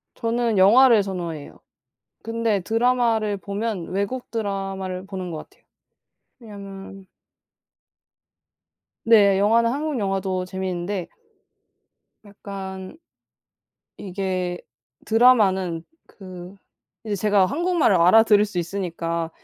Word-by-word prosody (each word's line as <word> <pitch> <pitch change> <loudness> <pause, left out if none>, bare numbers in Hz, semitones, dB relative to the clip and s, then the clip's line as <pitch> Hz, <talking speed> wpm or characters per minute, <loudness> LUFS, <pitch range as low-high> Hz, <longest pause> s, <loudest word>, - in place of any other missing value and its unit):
저는 230 -1 -1
영화를 225 +3 +6
선호해요. 170 -6 -6 0.6
근데 225 -3 -1
드라마를 225 -1 +1
보면 200 0 -4
외국 200 +7 -3
드라마를 195 -4 -4
보는 185 -2 -6
것 160 - -5
같아요. - - -29 0.8
왜냐하면 195 -3 -11 2.0
네. 205 -4 +5
영화는 230 +3 +3
한국 295 +1 -2
영화도 195 -3 -2
재미있는데 185 0 -4 1.2
약간 195 0 -8 1.0
이게 185 -2 -3 0.5
드라마는 195 -8 +3 0.2
그 185 -1 -11 0.5
이제 215 -2 -2
제가 200 -1 +3
한국말을 335 - +1
알아들을 210 +4 +5
수 205 -4 -5
있으니까 170 -2 -3
195 Hz, 225 characters per minute, -23 LUFS, 185-225 Hz, 2.0 s, 영화를